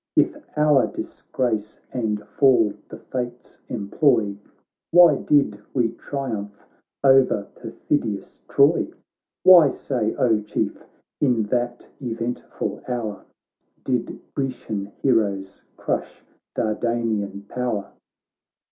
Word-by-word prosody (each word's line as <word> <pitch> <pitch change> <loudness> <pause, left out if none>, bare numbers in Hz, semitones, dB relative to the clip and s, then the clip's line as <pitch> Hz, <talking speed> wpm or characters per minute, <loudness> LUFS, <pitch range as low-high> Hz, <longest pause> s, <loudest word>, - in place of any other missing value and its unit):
If - - +3 0.2
our 150 -2 +4
disgrace 110 -5 -3
and 110 -4 -1
fall 120 -5 +3 0.2
the - - -8
fates 125 -1 -6
employ, 110 -1 +1 0.5
Why 170 -4 +7
did 140 -9 +2 0.2
we 120 -3 +3
triumph 110 -8 -5 0.4
o'er 130 -6 +5
perfidious 110 -9 -3
Troy? - - +4 0.6
Why, 175 -6 +9
say, 120 -5 -2
O 110 -4 +2
Chief, 105 - -3 0.4
in 125 -6 +2
that 120 0 -1
eventful 120 -1 -4
hour 115 -6 -4 0.6
Did 125 -3 -2
Grecian 120 -7 -3 0.2
heroes 100 -7 +1 0.2
crush - - -3 0.3
Dardanian 110 -3 -1
power 120 -5 -3
120 Hz, 95 wpm, -23 LUFS, 105-130 Hz, 0.6 s, Why